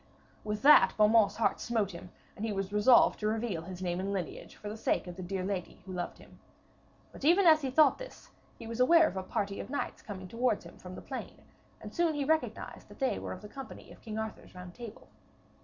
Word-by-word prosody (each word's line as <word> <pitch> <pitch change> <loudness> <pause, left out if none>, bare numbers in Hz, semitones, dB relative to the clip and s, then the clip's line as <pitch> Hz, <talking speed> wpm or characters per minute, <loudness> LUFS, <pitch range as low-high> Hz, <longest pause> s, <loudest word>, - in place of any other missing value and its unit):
With 210 +1 -4
that 275 -10 +7
Beaumains' 210 -1 +5
heart 225 - +1
smote 220 -5 -1
him, 175 0 -10 0.3
and 205 - -7
he 225 - -1
was 195 0 -3
resolved 215 +4 +5
to 210 - -1
reveal 215 -5 -1
his 185 +2 -8
name 175 0 -1
and 195 +1 -2
lineage 185 -5 -5
for 210 - -9
the 210 - -5
sake 225 - 0
of 180 -1 -8
the 185 - -7
dear 185 +1 -3
lady 185 -2 -4
who 190 - -7
loved 175 -1 -4
him. - - -17 0.7
But - - -12
even 350 +6 +5
as 315 -2 +7
he 270 - -2
thought 285 +1 +4
this, - - -11 0.3
he 230 - -10
was 230 +1 -6
aware 325 +5 +6
of - - -5
a 190 - -2
party 200 +1 -3
of - - -6
knights 285 - -3
coming 190 -3 -8
towards 240 +6 0
him - - -13
from - - -9
the - - -9
plain, - - -7 0.4
and - - -10
soon 340 -3 +1
he 285 -1 -1
recognised 315 +2 -1
that - - -14
they 265 -2 0
were - - -6
of 185 - -11
the - - -7
company 270 +4 -10
of - - -15
King 220 -2 -6
Arthur's 220 -3 -6
Round 180 -1 -9
Table. 230 -1 -10
215 Hz, 235 wpm, -31 LUFS, 190-260 Hz, 0.7 s, that